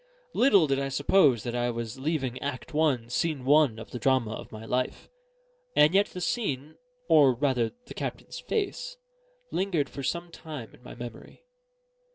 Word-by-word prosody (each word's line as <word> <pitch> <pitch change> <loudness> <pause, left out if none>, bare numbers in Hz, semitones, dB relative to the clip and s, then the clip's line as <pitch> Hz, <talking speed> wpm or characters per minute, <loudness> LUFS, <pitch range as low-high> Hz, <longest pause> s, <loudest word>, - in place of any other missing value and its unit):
Little 205 - +5
did 135 -2 +1
I 135 0 -1
suppose 140 - +3
that 120 - -3
I 120 0 0
was 115 +1 -4
leaving 135 -4 -2
Act 140 +2 -5
I, 150 -6 +2
Scene 135 +2 -2
I, 150 +2 +7 0.2
of 115 - -10
the 125 - -5
drama 130 -3 +2
of - - -8
my 110 0 -8
life; 125 - -2 0.6
and 150 +3 +6
yet 200 +1 +4
the 180 - -8
scene, 155 - -2 0.3
or 145 -5 +6
rather 125 -3 +1 0.2
the - - -9
captain's - - -5
face, 455 +4 -3 0.5
lingered 175 -8 0
for 140 - -7
some 170 +5 -3
time 150 -9 -8
in - - -18
my 125 - -10
memory. 120 - -10
140 Hz, 170 wpm, -28 LUFS, 120-160 Hz, 0.6 s, I